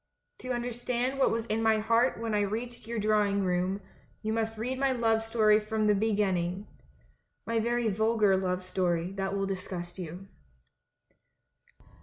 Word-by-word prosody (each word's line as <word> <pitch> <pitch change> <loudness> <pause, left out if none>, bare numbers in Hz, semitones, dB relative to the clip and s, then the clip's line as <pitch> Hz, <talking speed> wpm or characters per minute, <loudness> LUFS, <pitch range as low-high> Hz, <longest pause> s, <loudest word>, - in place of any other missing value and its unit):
To 255 - -8
understand 245 +2 -2
what 265 - +4
was 225 0 -1
in 225 -1 -1
my 220 -1 +4
heart 230 +3 +2
when 230 -1 -2
I 210 - +2
reached 225 +3 -3
your 235 0 -3
drawing 210 -2 +2
room, 185 +2 0 0.4
you 220 0 -1
must 225 0 -1
read 255 +4 -3
my 275 -1 +2
love 225 -3 +2
story 220 -1 +3
from 215 0 -1
the 210 - +5
beginning 195 -3 0 0.4
— - - -39
my 230 0 0
very 240 +1 0
vulgar 215 -1 +3
love 185 -1 -1
storj^ 180 -1 -1
that 195 0 -1
will 195 - 0
disgust 185 -2 -5
you. 180 +2 -7
215 Hz, 160 wpm, -29 LUFS, 195-230 Hz, 0.4 s, the